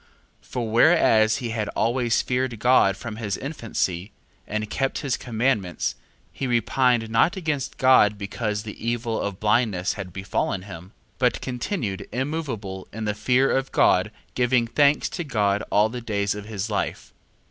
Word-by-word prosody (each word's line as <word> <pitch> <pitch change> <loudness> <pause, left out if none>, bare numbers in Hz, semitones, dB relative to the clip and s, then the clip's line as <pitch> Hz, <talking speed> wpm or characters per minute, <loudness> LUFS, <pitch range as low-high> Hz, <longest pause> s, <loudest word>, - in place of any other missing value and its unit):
2:13. - - -24
For 120 -3 -3
whereas 110 -5 +5
he 125 -4 -4
had 110 -2 -2
always 120 +1 +1
feared 125 -1 -1
God 105 -4 +4
from 110 -2 -7
his 105 -4 -3
infancy, 110 - -3 0.4
and 110 +1 -2
kept 135 +5 -1
his 135 - +1
commandments, 110 -6 -1 0.4
he 135 - -4
repined 120 0 +2
not 135 +11 +3
against 155 -7 -2
God 115 -6 +5
because 105 +1 -3
the 110 -1 -9
evil 115 -1 -1
of 100 -2 -4
blindness 105 -4 +1
had 95 -3 -7
befallen 95 0 -2
him, 90 -3 -9
2:14. - - -22 0.3
But 125 -1 +1
continued 120 - -3
immoveable 125 -9 -4
in 110 0 -5
the 105 - 0
fear 125 +5 +2
of 135 0 -1
God, - - +3 0.2
giving 125 -1 +2
thanks 145 +5 +3
to 175 - -4
God 105 -8 +1
all 105 +1 +4
the 120 +2 -6
days 100 -3 -1
of 105 0 -7
his 105 -1 -4
life. 100 - -3
115 Hz, 160 wpm, -24 LUFS, 105-125 Hz, 0.4 s, whereas